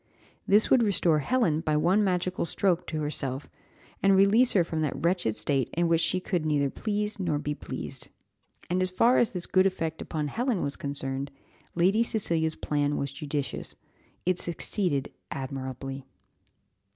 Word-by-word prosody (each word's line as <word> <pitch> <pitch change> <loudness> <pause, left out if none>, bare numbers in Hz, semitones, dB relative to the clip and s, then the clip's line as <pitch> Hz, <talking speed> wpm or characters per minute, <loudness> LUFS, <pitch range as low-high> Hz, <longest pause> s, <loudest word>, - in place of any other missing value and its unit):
This 210 +2 +4
would 260 - +6
restore 180 -7 +3
Helen 175 - +1
by 155 -1 +1
one 180 +7 +3
magical 185 -1 0
stroke 180 0 0
to 155 -1 -3
herself, 140 -2 -2 0.5
and 195 0 +5
release 205 +6 +5
her 185 - +4
from 160 -1 -3
that 150 -3 -1
wretched 170 - 0
state 130 +4 +1
in 170 +1 +2
which 165 0 +3
she 185 +3 +1
could 180 -3 -1
neither 145 -3 +1
please 210 -1 -2
nor 170 -6 0
be 150 0 -2
pleased." - - -7 0.6
And 180 +1 0
as 185 - +1
far 230 +7 +4
as 235 - +3
this 180 -2 -3
good 185 0 +4
effect 165 -4 -3
upon 150 -2 -3
Helen 240 - -1
was 140 - -1
concerned, 140 -1 -4 0.5
Lady 190 +6 +3
Cecilia's 170 -9 0
plan 145 -1 -1
was 140 -1 -2
judicious; 145 0 -4 0.5
it 180 0 +1
succeeded 170 -4 -1 0.2
admirably. 135 0 -5
165 Hz, 160 wpm, -28 LUFS, 145-190 Hz, 0.6 s, would